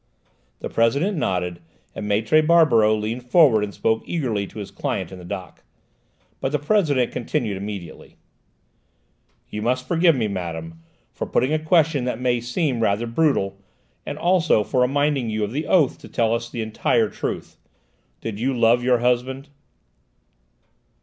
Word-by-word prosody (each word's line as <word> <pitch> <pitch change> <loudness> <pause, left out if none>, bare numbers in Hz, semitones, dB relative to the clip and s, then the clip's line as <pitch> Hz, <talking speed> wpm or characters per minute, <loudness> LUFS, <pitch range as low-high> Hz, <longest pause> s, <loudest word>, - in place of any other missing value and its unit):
The - - -3
President 140 - +1
nodded, 90 - -2 0.3
and 105 - -5
Maître 110 +9 +3
Barberoux 150 -10 +4
leaned 115 +4 -5
forward 130 -9 +5
and 105 - -3
spoke 110 +2 0
eagerly 115 - -2
to - - -14
his 100 -2 -6
client - - -3
in 95 - -9
the - - -11
dock. 95 0 -7 0.8
But 135 - -2
the 150 - +1
President 145 - +1
continued 105 -4 -2
immediately. 95 -4 -8 1.4
"You 105 - -4
must 130 +3 -1
forgive 170 0 +4
me, 115 -4 0
madame, 80 -4 -5 0.3
for - - -4
putting 130 +5 +1
a 155 - +2
question 155 -4 +2
that 125 -2 -2
may 125 -1 +1
seem 125 +1 -1
rather 110 +1 +1
brutal, 115 -7 0 0.4
and - - -6
also 175 - +3
for 125 +5 0
reminding 140 -1 +1
you 110 0 -1
of 105 +4 -4
your 155 - -2
oath 160 -8 +3
to - - -12
tell 115 -2 0
us 115 0 -3
the 120 -2 -4
entire 110 0 +1
truth. - - -5 0.6
Did 110 -2 -5
you 130 +2 0
love 120 +1 +4
your 125 0 +3
husband?" 130 +3 0
120 Hz, 155 wpm, -22 LUFS, 105-145 Hz, 1.4 s, forward